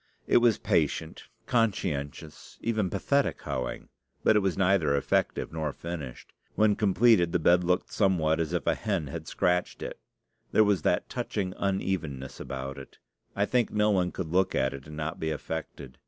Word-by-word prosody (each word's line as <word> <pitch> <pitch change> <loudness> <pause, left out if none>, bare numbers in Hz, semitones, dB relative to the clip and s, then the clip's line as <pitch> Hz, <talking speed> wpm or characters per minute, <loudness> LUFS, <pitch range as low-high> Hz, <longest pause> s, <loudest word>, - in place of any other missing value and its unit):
It - - +4
was 120 -3 +4
patient, 80 +1 -1 0.2
conscientious, 85 - -2
even 110 -4 0
pathetic 140 +9 0
hoeing; 65 -1 -4 0.3
but - - +5
it - - +6
was 95 -3 -1
neither 90 -6 +3
effective 70 - 0
nor 80 -2 -2
finished. 75 -6 -7 0.2
When 105 -1 +4
completed, 100 -4 +4
the - - +4
bed 90 +2 +4
looked 90 +1 0
somewhat 85 -6 +2
as 80 -1 -1
if 90 -2 -1
a - - +3
hen 95 -7 -2
had 80 +3 -7
scratched 90 0 0
it; - - -6 0.5
there 110 - +6
was 100 -5 +2
that - - +1
touching 95 -3 -3
unevenness 95 -10 -2
about 70 0 -5
it. 65 - -13 0.4
I 100 - +2
think 125 0 +1
no 105 0 +2
one 90 -3 +1
could 85 -4 -5
look 95 +1 +2
at 65 +1 +1
it 70 +1 -9
and 75 0 -9
not 80 +1 -4
be 80 - -1
affected. 75 -4 -6
90 Hz, 170 wpm, -28 LUFS, 75-100 Hz, 0.5 s, it